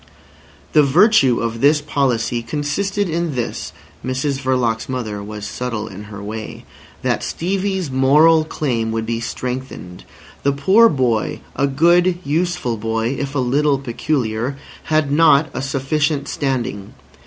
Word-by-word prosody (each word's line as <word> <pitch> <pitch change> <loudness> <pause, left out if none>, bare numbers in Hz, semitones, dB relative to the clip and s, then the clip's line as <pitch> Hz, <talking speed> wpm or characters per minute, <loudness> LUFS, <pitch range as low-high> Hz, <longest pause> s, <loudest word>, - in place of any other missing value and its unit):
The 150 - +6
"virtue" 140 - +4
of 115 0 -3
this 150 +2 +5
policy 130 -5 0
consisted 185 - -2
in 165 -3 -2
this 120 -2 -3 0.3
(Mrs 135 +2 -2
Verloc's 125 -4 0
mother 110 -6 -4
was 105 0 -7
subtle 115 -2 -4
in 100 0 -9
her 105 -1 -9
way), 110 +1 -7 0.4
that - - 0
Stevie's 190 -2 -2
moral 150 +5 +5
claim 125 -8 -2
would 110 0 -2
be 115 0 -2
strengthened. 125 -6 -6 0.4
The 140 - +1
poor 195 +11 +5
boy—a 130 +1 -1
good, 175 +5 +3
useful 160 -5 -1
boy, 115 +1 -1
if 140 0 -4
a - - +1
little 140 +3 +2
peculiar—had 135 +3 -2
not 155 0 +4
a - - -3
sufficient 140 +2 -1
standing. 125 -8 -3
135 Hz, 130 wpm, -19 LUFS, 115-155 Hz, 0.4 s, The